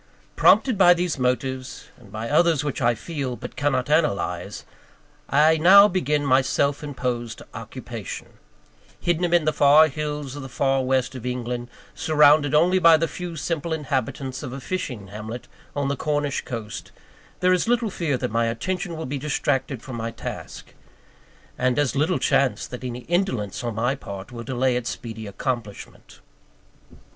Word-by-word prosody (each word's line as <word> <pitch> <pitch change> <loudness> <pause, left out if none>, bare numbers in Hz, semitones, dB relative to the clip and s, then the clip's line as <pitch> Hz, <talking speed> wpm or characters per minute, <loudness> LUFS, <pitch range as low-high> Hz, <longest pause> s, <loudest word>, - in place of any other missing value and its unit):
Prompted 250 -7 +4
by 175 -2 +7
these 175 -4 -2
motives, 130 +1 -2
and 110 -6 -18
by 110 +2 -5
others 165 +2 +3
which 145 -2 -3
I 120 -1 +3
feel, 135 -1 -4
but - - -9
cannot 140 -3 0
analyse, 150 -10 0 0.6
I 155 +3 +4
now 195 +5 +8
begin 150 -6 0
my 130 -1 +5
self 140 +2 0
imposed 125 -5 -4
occupation. - - -7 0.7
Hidden 175 0 0
amid 170 -2 +2
the 155 - +2
far 150 +2 +6
hills 150 -1 -4
of 145 - -6
the 135 - -8
far 135 +1 +1
West 130 0 0
of 130 -3 -8
England, 125 -1 -4 0.2
surrounded 150 -1 +4
only 180 +4 +4
by 165 -2 +7
the 165 +1 0
few 175 -1 -6
simple 160 +1 -2
inhabitants 135 -3 -3
of 125 - -6
a 135 - -5
fishing 125 - -5
hamlet 110 +4 -7 0.3
on 140 -1 0
the 140 - 0
Cornish 145 -1 -1
coast, 110 -3 -6 0.5
there 185 0 +4
is 180 - +1
little 235 -3 +1
fear 155 -8 -1
that 125 -2 -3
my 115 +1 +1
attention 170 +9 -3
will 160 - -4
be 140 +2 -4
distracted 135 -3 -1
from 130 -3 -7
my 115 0 -3
task; 115 - -8 0.9
and 125 +1 +1
as 145 -2 +1
little 155 +6 +2
chance 135 -2 +1
that 125 0 -8
any 125 -1 -5
indolence 125 - -1
on 120 -2 -3
my 120 +4 +1
part 100 -5 -8
will 120 -1 -7
delay 130 +1 0
its 125 -1 -2
speedy 110 -2 -7
accomplishment. 115 -1 -6
135 Hz, 165 wpm, -24 LUFS, 125-155 Hz, 0.9 s, now